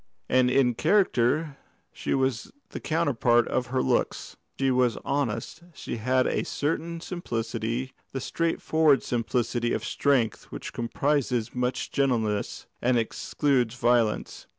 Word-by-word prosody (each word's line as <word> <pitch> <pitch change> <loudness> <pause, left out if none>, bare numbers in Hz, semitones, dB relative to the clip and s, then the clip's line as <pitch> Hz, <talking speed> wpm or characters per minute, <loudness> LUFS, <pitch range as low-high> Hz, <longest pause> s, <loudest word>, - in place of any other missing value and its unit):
And 130 -1 +3
in 125 -1 +3
character 150 - +2 0.4
she - - -2
was 130 -3 -1 0.2
the - - -6
counterpart 125 -7 +2
of 125 -1 0
her 130 +1 0
looks. - - -1 0.2
She 135 -1 +2
was 125 -2 +2
honest; 140 +3 -2
she - - -5
had 130 +3 +2
a - - 0
certain 165 +3 -2
simplicity, 120 -6 -3 0.2
the 135 - -3
straightforward 160 -1 +2
simplicity 120 0 -1
of - - -2
strength 135 -6 +1
which - - -8
comprises 125 -1 0
much 125 0 -2
gentleness 115 -7 0 0.2
and 125 0 +3
excludes 125 +1 0
violence. 120 -3 +1
125 Hz, 125 wpm, -27 LUFS, 120-140 Hz, 0.4 s, And